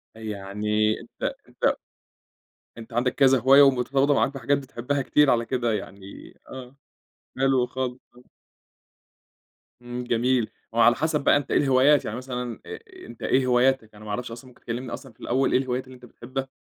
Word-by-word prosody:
يعني 105 0 -2
أنت - - -5 0.2
أنت - - 0 1.0
أنت 115 0 -11
عندك 125 +2 +1
كذا 135 -2 +4
هواية 135 +3 +6
ومرتبطة 135 +1 +3
معاك 140 0 +1
بحاجات 140 +1 0
بتحبها 135 0 -3
كتير 150 +2 +3
على 115 -1 +1
كده 120 -2 -1
يعني، 100 -1 -8 0.2
آه 130 0 -10 0.6
حلو 135 -2 +2
خالص، 130 0 -4 0.2
آه. 125 - -16 1.6
إمم، 120 0 -6
جميل 120 0 0 0.2
وعلى 120 +1 +4
حسب 155 0 -1
بقى - - +5
أنت 145 - -5
إيه - - +3
الهوايات 135 +1 +4
يعني 110 - -4
مثلًا 125 -2 -5
أ - - -7 0.3
أنت 115 -1 -12
إيه 130 0 +2
هواياتك؟ 125 -3 +2
أنا 105 - -13
ما - - -8
أعرفش 120 +2 -4
أصلًا 120 +3 -10
ممكن 125 - -19
تكلِّمني 120 +2 -5
أصلًا 135 -4 -9
في - - -37
الأول 130 +2 0
إيه - - +4
الهوايات 130 0 -2
اللي 130 - -13
أنت 125 0 -15
بتحبها؟ 130 +3 -6
125 Hz, 170 wpm, -25 LUFS, 115-135 Hz, 1.6 s, هواية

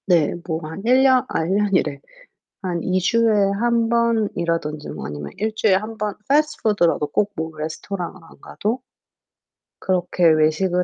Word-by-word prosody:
네. 170 -5 +3
뭐 160 -2 -1
한 160 +5 -7
1 255 +2 +5
년 260 -1 +4
아 160 - -1
1 185 +4 0
년이래. 190 -9 +1 0.6
한 180 -3 -2
2 185 0 0
주에 230 +5 +2 0.3
1 235 -1 +2
번이라든지 175 -10 0
뭐 - - -6
아니면 75 -1 -7
1 220 +2 -1
주일에 210 -3 +3
1 215 +3 -4
번 210 -1 -2
패스트푸드라도 215 - +2
꼭 205 +7 0
뭐 160 -2 -4
레스토랑을 175 +4 -5
안 165 - -18
가도 225 - -3 1.0
그렇게 180 -1 0
외식을 160 +4 +2
185 Hz, 260 characters per minute, -21 LUFS, 160-220 Hz, 1.0 s, 1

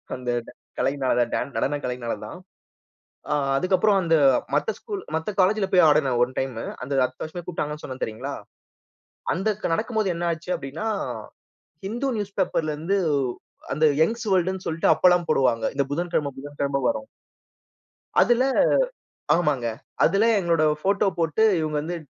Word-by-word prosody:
அந்த 125 -1 -5 0.5
கலைனால, 130 -3 +1
டா - - +1 0.2
நடன 145 +1 0
கலையினால 125 -2 -3
தான். 110 - -8 0.9
ஆ, - - +2 0.2
அதுக்கப்புறம் 195 +5 +3
அந்த 165 -2 +3 0.4
மத்த - - +1
ஸ்கூல் 410 -4 -6
மத்த 160 +6 -1
காலேஜில 195 +2 +3
போயி 185 - +6
ஆடுனேன் 140 -5 +3
ஒன் 125 +1 0
டைமு 130 -4 -3 0.2
அந்த 135 +3 -5
அடுத்த 130 0 -4
வருஷமே 175 +3 -7
கூப்ட்டாங்கன்னு 150 -3 -4
சொன்னேன் 130 0 -7
தெரியுங்களா! 125 +6 -4 1.0
அந்த 195 +4 -2 0.3
நடக்கும்போது 220 0 0
என்னா 170 0 -1
ஆச்சு 170 +3 -7
அப்பிடின்னா, 145 +10 -5 1.0
ஹிந்து 240 +7 -2
நியூஸ்பேப்பர்ல 190 -6 -1
இருந்து 180 +6 0 0.8
அந்த 155 +2 +2 0.2
யங்ஸ் 230 +8 +1
வேர்ல்டுன்னு 185 0 +1
சொல்ட்டு 165 0 0
அப்பலாம் 180 +1 +4
போடுவாங்க. 125 -5 +2
இந்த 140 - +2
புதன்கிழமை, 165 -2 -1
புதன்கிழமை 140 0 -2
வரும். 280 -1 -3 1.1
அதுல 240 +1 +4 0.9
ஆமாங்க. 150 -8 0 0.4
அதுல 195 +5 +3
எங்களோட 170 -3 +1 0.2
போட்டோ 200 +1 +2
போட்டு 165 +5 +1 0.2
இவுங்க 155 -1 -2
வந்து 175 +3 -4
165 Hz, 135 wpm, -24 LUFS, 140-190 Hz, 1.1 s, போயி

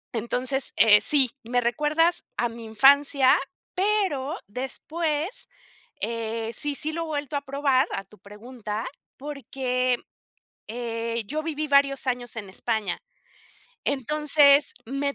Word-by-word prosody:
entonces, 250 +4 -1
eh, 210 -2 +7
sí. 270 -5 +3
Me 245 +2 0
recuerdas 300 +8 +1
a 240 - +1
mi 230 0 -9
infancia, 270 +4 +5 0.4
pero 375 -8 0
después, 305 - -2 0.5
eh, 230 0 -3
sí, 290 +5 -2
sí 310 +3 -1
lo 335 +1 -3
he - - -5
vuelto 290 -2 -4
a 280 - 0
probar, 275 -1 +1
a 195 - -3
tu 210 +3 -20
pregunta, 215 +1 -7 0.3
porque, 255 -3 -2 0.7
eh, 230 -1 -3
yo 310 +5 -3
viví 305 -1 -3
varios 280 -1 +3
años 245 -2 -2
en 205 -3 -6
España. 210 -1 -2 0.8
Entonces 290 +1 +3
me 275 +2 -2
265 Hz, 125 wpm, -25 LUFS, 230-290 Hz, 0.8 s, eh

